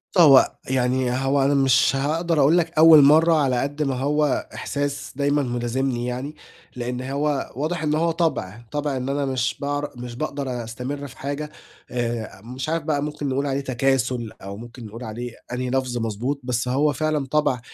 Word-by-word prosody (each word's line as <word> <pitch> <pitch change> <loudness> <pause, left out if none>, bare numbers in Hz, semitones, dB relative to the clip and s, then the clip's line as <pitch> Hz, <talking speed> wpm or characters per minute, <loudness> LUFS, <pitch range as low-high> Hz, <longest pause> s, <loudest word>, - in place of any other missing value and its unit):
بُصّ، 180 - +6
هو 140 -5 +7 0.2
يعني 130 -1 +1
هو 135 +2 +1
أنا 140 +1 +3
مِش 135 -1 +4
هاقدَر 160 +3 0
أقول 145 +5 +5
لَك 170 -1 0
أوّل 160 -1 +9
مَرّة 160 +4 +6
على 135 -5 +2
قد 145 +2 -2
ما 135 -2 -1
هو 145 +1 0
إحساس 140 0 -3
دايمًا 145 0 +1
مِلازمنِي 120 0 -1
يعني، 130 +5 -4 0.4
لإن 125 0 -3
هو 140 +2 -1
واضِح 155 +4 -2
إن 150 0 +1
هو 165 +1 +2
طَبع، 120 - -1
طَبع 145 -2 -1
إن 130 +1 -3
أنا 140 0 0
مِش 130 -2 -1
باعر 145 0 -2
مِش 120 -1 -7
باقدَر 135 -4 -3
أستمرّ 125 +5 -5
في 135 - -14
حاجة، 145 +2 -4 0.4
آآ، 120 -4 -3
مِش 130 +6 -6
عارف 165 -1 -1
بَقى 150 -2 0
مُمكِن 150 -1 -3
نقول 140 +2 0
عليه 140 0 -1
تَكاسُل، 130 -3 0
أو 100 +1 -7
مُمكِن 120 +1 -10
نقول 115 +3 -9
عليه 120 +2 -5 0.2
أنهي 125 0 -2
لَفظ 130 -1 -1
مَضبوط، 120 +5 -2
بس 125 0 -1
هو 145 +4 +2
فِعلًا 155 -2 -1
طَبع 135 -2 +1
135 Hz, 185 wpm, -23 LUFS, 125-145 Hz, 0.4 s, أوّل